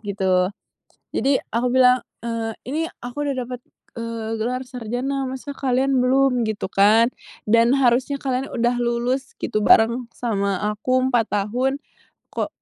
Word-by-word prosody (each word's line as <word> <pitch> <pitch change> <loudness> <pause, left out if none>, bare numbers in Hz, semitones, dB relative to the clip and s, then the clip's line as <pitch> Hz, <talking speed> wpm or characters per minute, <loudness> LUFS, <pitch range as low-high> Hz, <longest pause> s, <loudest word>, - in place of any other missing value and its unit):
gitu. 190 -3 +1 0.7
Jadi, 275 0 +2 0.2
aku 235 +2 +1
bilang, 250 -1 +5 0.2
eee, 230 -1 -2 0.2
"Ini 300 +6 -1 0.2
aku 245 +4 -4
udah 285 -1 -1
dapet, 250 -1 -7 0.3
eee, 230 -1 -4
gelar 245 +3 -2
sarjana, 250 +3 -3
masa 265 +2 -6
kalian 265 0 +1
belum?" 255 -2 +3
Gitu 215 -3 -3
kan. 215 +4 +5 0.4
Dan, 230 +2 +5
"Harusnya 265 +1 +2
kalian 265 0 -2
udah 240 +1 +1
lulus," 240 +2 -1
gitu 215 0 -1
"bareng 235 +3 +4
sama 200 -5 -1 0.2
aku 255 +4 +1
4 240 -4 +2
tahun. 245 +7 0 0.5
Kok - - -2
245 Hz, 140 wpm, -22 LUFS, 225-260 Hz, 0.7 s, bilang